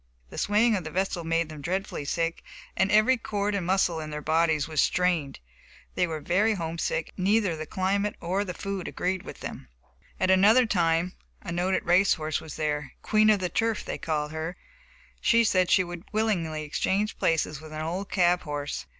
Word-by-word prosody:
The -, -, -5 dB
swaying 215 Hz, +2 st, +3 dB
of 185 Hz, -, -2 dB
the 155 Hz, -, -5 dB
vessel 185 Hz, 0 st, -1 dB
made 165 Hz, 0 st, 0 dB
them 155 Hz, -2 st, -9 dB
dreadfully 185 Hz, -2 st, -3 dB
sick, 165 Hz, +3 st, -1 dB, 0.3 s
and 190 Hz, +2 st, +2 dB
every 215 Hz, +5 st, +5 dB
cord 205 Hz, -2 st, -2 dB
and 190 Hz, -4 st, -2 dB
muscle 180 Hz, -3 st, +2 dB
in 155 Hz, -1 st, -6 dB
their 150 Hz, 0 st, -4 dB
bodies 160 Hz, -2 st, +2 dB
was 155 Hz, -2 st, +1 dB
strained. 175 Hz, -6 st, +1 dB, 0.5 s
They 180 Hz, -, +1 dB
were 160 Hz, -2 st, -4 dB
very 205 Hz, +7 st, +2 dB
home 165 Hz, -2 st, -4 dB
sick, 160 Hz, -, -2 dB
and 185 Hz, -, -4 dB
neither 205 Hz, -4 st, +2 dB
the 155 Hz, 0 st, -6 dB
climate 200 Hz, +4 st, 0 dB
nor 185 Hz, +4 st, -1 dB
the 180 Hz, -3 st, -6 dB
food 195 Hz, -2 st, -4 dB
agreed 185 Hz, +1 st, -2 dB
with -, -, -10 dB
them. -, -, -7 dB, 0.5 s
At 185 Hz, -, +3 dB
another 210 Hz, +7 st, +6 dB
time 170 Hz, -3 st, +1 dB, 0.3 s
a -, -, -5 dB
noted 180 Hz, +2 st, 0 dB
race 185 Hz, +3 st, +4 dB
horse 155 Hz, -1 st, -2 dB
was 160 Hz, -, -9 dB
there, 150 Hz, -3 st, -2 dB
"Queen 215 Hz, 0 st, +4 dB
of 210 Hz, -3 st, +4 dB
the 180 Hz, -, -1 dB
Turf," 225 Hz, +3 st, -1 dB
they -, -, -4 dB
called 150 Hz, -2 st, -2 dB
her. 160 Hz, +3 st, -4 dB, 0.6 s
She 230 Hz, 0 st, +4 dB
said 185 Hz, -5 st, +2 dB
she 185 Hz, -, +5 dB
would 175 Hz, -1 st, -8 dB
willingly 175 Hz, -8 st, 0 dB
exchange 195 Hz, +7 st, -1 dB
places 155 Hz, -2 st, 0 dB
with 155 Hz, 0 st, -11 dB
an 155 Hz, 0 st, -4 dB
old 180 Hz, +5 st, -3 dB
cab 180 Hz, -1 st, +3 dB
horse. 145 Hz, -, -4 dB
180 Hz, 195 wpm, -27 LUFS, 160-200 Hz, 0.6 s, another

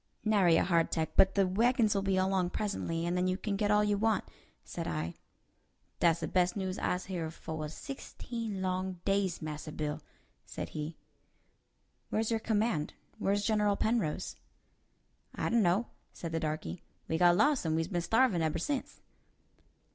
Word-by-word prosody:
"Nary 195 Hz, -6 st, +5 dB
a -, -, +3 dB
hardtack; 165 Hz, -3 st, +1 dB
but 190 Hz, 0 st, +5 dB
the 200 Hz, -1 st, +4 dB
wagons 225 Hz, +3 st, +3 dB
will 200 Hz, -, +1 dB
be 195 Hz, -1 st, +1 dB
along 185 Hz, -1 st, +2 dB
presently, 175 Hz, -4 st, -2 dB
and 175 Hz, +1 st, 0 dB
then 180 Hz, 0 st, +1 dB
you 185 Hz, 0 st, 0 dB
can 205 Hz, 0 st, -2 dB
get 205 Hz, +1 st, 0 dB
all 210 Hz, 0 st, +4 dB
you 205 Hz, -1 st, +1 dB
want," 220 Hz, 0 st, +2 dB, 0.4 s
said -, -, -5 dB
I. 80 Hz, +1 st, -2 dB, 0.9 s
"Dat's 170 Hz, -1 st, +3 dB
de -, -, -1 dB
best 180 Hz, +1 st, +2 dB
news 190 Hz, -1 st, -2 dB
I's 180 Hz, 0 st, -1 dB
heerd 170 Hz, -4 st, -4 dB
foah 155 Hz, -2 st, -5 dB
sixteen 230 Hz, -, -6 dB
long 185 Hz, 0 st, -2 dB
days, 195 Hz, -4 st, +1 dB
Massa 155 Hz, 0 st, -5 dB
Bill," 150 Hz, -1 st, -3 dB, 0.4 s
said -, -, -6 dB
he. 155 Hz, +1 st, -5 dB, 1.1 s
"Where's 220 Hz, +1 st, 0 dB
your 225 Hz, -, +2 dB
command? 215 Hz, -8 st, 0 dB, 0.2 s
Where's 200 Hz, +1 st, +1 dB
General 210 Hz, -2 st, +2 dB
Penrose?" 155 Hz, -, -1 dB, 1.0 s
I -, -, -4 dB
asked. -, -, 0 dB
"I -, -, +3 dB
dun'no'," 205 Hz, 0 st, +3 dB, 0.3 s
said 165 Hz, -, -6 dB
the 165 Hz, -, 0 dB
darky; 155 Hz, -, -3 dB, 0.3 s
"we 160 Hz, -, 0 dB
got 175 Hz, 0 st, +6 dB
lost 285 Hz, +4 st, +3 dB
and 160 Hz, -2 st, 0 dB
we's 165 Hz, 0 st, 0 dB
been 175 Hz, -2 st, -1 dB
starvin' 225 Hz, -1 st, +3 dB
eber 160 Hz, 0 st, 0 dB
since." 265 Hz, -, -3 dB
185 Hz, 170 wpm, -32 LUFS, 165-210 Hz, 1.1 s, got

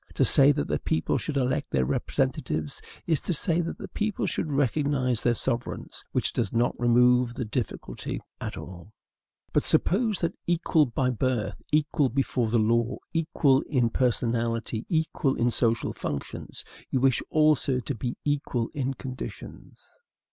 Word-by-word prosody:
To -, -, +3 dB
say 140 Hz, +1 st, +7 dB
that 70 Hz, -, -2 dB
the -, -, -1 dB
people 80 Hz, -, 0 dB
should 150 Hz, -3 st, -3 dB
elect 130 Hz, -1 st, 0 dB
their 65 Hz, -1 st, +1 dB
representatives 75 Hz, +3 st, -1 dB, 0.2 s
is 160 Hz, -4 st, +1 dB
to 180 Hz, -, -1 dB
say 170 Hz, +2 st, +1 dB
that 170 Hz, -, -4 dB
the -, -, -7 dB
people 210 Hz, -2 st, -2 dB
should 155 Hz, -, -1 dB
recognize 140 Hz, -3 st, +1 dB
their 120 Hz, -1 st, +2 dB
sovereigns, 120 Hz, 0 st, -3 dB
which -, -, 0 dB
does 110 Hz, -5 st, 0 dB
not 120 Hz, +1 st, +1 dB
remove 125 Hz, 0 st, +4 dB
the 125 Hz, -, -3 dB
difficulty 110 Hz, +1 st, -4 dB, 0.2 s
at -, -, -5 dB
all. 95 Hz, +3 st, -10 dB, 0.6 s
But -, -, +3 dB
suppose 215 Hz, +2 st, +3 dB
that, 170 Hz, -, 0 dB
equal 165 Hz, -3 st, +3 dB
by 125 Hz, +2 st, 0 dB
birth, 125 Hz, -2 st, -1 dB
equal 150 Hz, -2 st, +2 dB
before 125 Hz, -2 st, 0 dB
the 120 Hz, -, +2 dB
law, 115 Hz, +2 st, +2 dB, 0.2 s
equal 155 Hz, -4 st, +2 dB
in 125 Hz, -5 st, +2 dB
personality, 115 Hz, -2 st, 0 dB
equal 160 Hz, -4 st, +1 dB
in 120 Hz, +1 st, +1 dB
social 115 Hz, -1 st, +1 dB
functions, 70 Hz, -2 st, -6 dB, 0.3 s
you 130 Hz, -, +1 dB
wish 130 Hz, -1 st, +3 dB
also 150 Hz, -4 st, +3 dB
to 140 Hz, -, -3 dB
be 120 Hz, +1 st, -4 dB
equal 140 Hz, -5 st, -1 dB
in 135 Hz, -1 st, -2 dB
conditions. 130 Hz, 0 st, -8 dB
125 Hz, 155 wpm, -27 LUFS, 115-145 Hz, 0.6 s, say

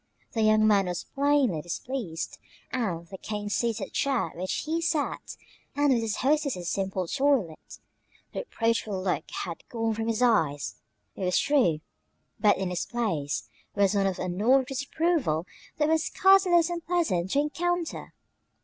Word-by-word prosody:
The 225 Hz, -, -1 dB
young 215 Hz, 0 st, +4 dB
man 200 Hz, -3 st, +4 dB
was 175 Hz, -1 st, -3 dB
plainly 280 Hz, -, +1 dB
displeased 175 Hz, -, -5 dB, 0.3 s
with 175 Hz, -9 st, -2 dB
the 190 Hz, -, -8 dB
cane 210 Hz, -1 st, -4 dB
seated 225 Hz, -3 st, -1 dB
chair 265 Hz, -, +1 dB
in 165 Hz, -, -13 dB
which 185 Hz, -, -2 dB
he 325 Hz, +2 st, -1 dB
sat, 325 Hz, -3 st, -2 dB, 0.4 s
and 290 Hz, -1 st, +3 dB
with 235 Hz, -, +1 dB
his 225 Hz, -2 st, -1 dB
hostess's 280 Hz, -, +1 dB
simple 190 Hz, -1 st, -1 dB
toilet. 265 Hz, -, 0 dB, 0.6 s
The -, -, -3 dB
reproachful 230 Hz, -, -1 dB
look 185 Hz, -1 st, -2 dB
had 170 Hz, -2 st, -5 dB
gone 225 Hz, -1 st, -1 dB
from 225 Hz, +1 st, -3 dB
his 230 Hz, +1 st, +1 dB
eyes, 155 Hz, -, +1 dB, 0.4 s
it -, -, -5 dB
was 180 Hz, 0 st, +2 dB
true, 215 Hz, -, +2 dB, 0.6 s
but 210 Hz, -2 st, +4 dB
in 190 Hz, -1 st, -2 dB
its 175 Hz, -, -2 dB
place 160 Hz, -, -2 dB, 0.3 s
was 200 Hz, 0 st, +3 dB
one 200 Hz, -1 st, +2 dB
of 190 Hz, -, -2 dB
annoyed 215 Hz, +9 st, +2 dB
disapproval 275 Hz, -, 0 dB, 0.3 s
that 300 Hz, -, +2 dB
was 320 Hz, 0 st, +2 dB
scarcely 385 Hz, -1 st, +4 dB
less 345 Hz, 0 st, +4 dB
unpleasant 335 Hz, -, 0 dB
to 275 Hz, -, +2 dB
encounter. 340 Hz, +3 st, -2 dB
225 Hz, 155 wpm, -27 LUFS, 185-285 Hz, 0.6 s, young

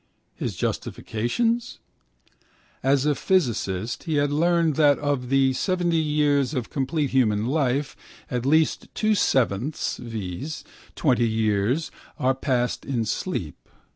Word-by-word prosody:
His -, -, -4 dB
justifications? 225 Hz, -, -2 dB, 1.0 s
As 135 Hz, +1 st, +2 dB
a 150 Hz, -, +3 dB
physicist 115 Hz, -, -1 dB
he 160 Hz, -3 st, -1 dB
had 145 Hz, 0 st, +2 dB
learned 165 Hz, 0 st, +2 dB
that 145 Hz, -3 st, +5 dB
of 140 Hz, -4 st, -2 dB
the 135 Hz, -1 st, +3 dB
70 175 Hz, +4 st, 0 dB
years 150 Hz, -3 st, +2 dB
of 125 Hz, -3 st, -3 dB
complete 140 Hz, +1 st, -1 dB
human 110 Hz, -5 st, +2 dB
life 135 Hz, 0 st, 0 dB, 0.4 s
at 125 Hz, -2 st, -1 dB
least 155 Hz, +4 st, +2 dB
2/7, 140 Hz, -, +1 dB
viz. 115 Hz, -, -5 dB, 0.3 s
20 125 Hz, -5 st, +2 dB
years 110 Hz, +6 st, 0 dB, 0.3 s
are 130 Hz, +1 st, +2 dB
passed 125 Hz, -2 st, -1 dB
in 120 Hz, -5 st, -1 dB
sleep. -, -, -4 dB
135 Hz, 115 wpm, -24 LUFS, 120-155 Hz, 1.0 s, that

